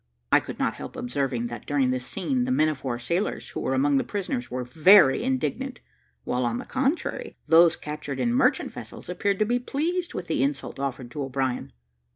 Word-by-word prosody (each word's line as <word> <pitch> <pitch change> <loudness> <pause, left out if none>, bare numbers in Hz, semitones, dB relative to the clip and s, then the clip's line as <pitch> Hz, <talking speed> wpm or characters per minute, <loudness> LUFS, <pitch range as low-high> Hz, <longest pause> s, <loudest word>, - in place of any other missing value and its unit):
I - - +7
could - - -8
not - - 0
help - - -8
observing 125 -1 -2
that, 120 -2 -8
during 135 -3 +2
this 125 -1 -3
scene, 245 +6 -1
the 255 - -1
men 155 -11 +3
of 150 -4 -5
war 125 -3 -2
sailors 170 - -2
who - - -5
were 135 - 0
among 140 +1 +3
the - - +2
prisoners, 210 +5 -3
were 125 0 -3
very 155 +4 +6
indignant, 260 0 -2 0.4
while, 125 +1 -1
on 120 -1 0
the - - -6
contrary, 270 +5 -1
those 165 0 +6
captured 150 -3 -6
in 235 - +1
merchant 255 +2 +2
vessels - - -9
appeared 195 +2 0
to 215 - +2
be 240 +3 +1
pleased 335 +8 -2
with 180 - -4
the 160 - 0
insult 140 0 -2
offered 130 -3 -4
to 145 - -5
O'Brien. 135 -1 -2
155 Hz, 200 wpm, -26 LUFS, -, 0.4 s, I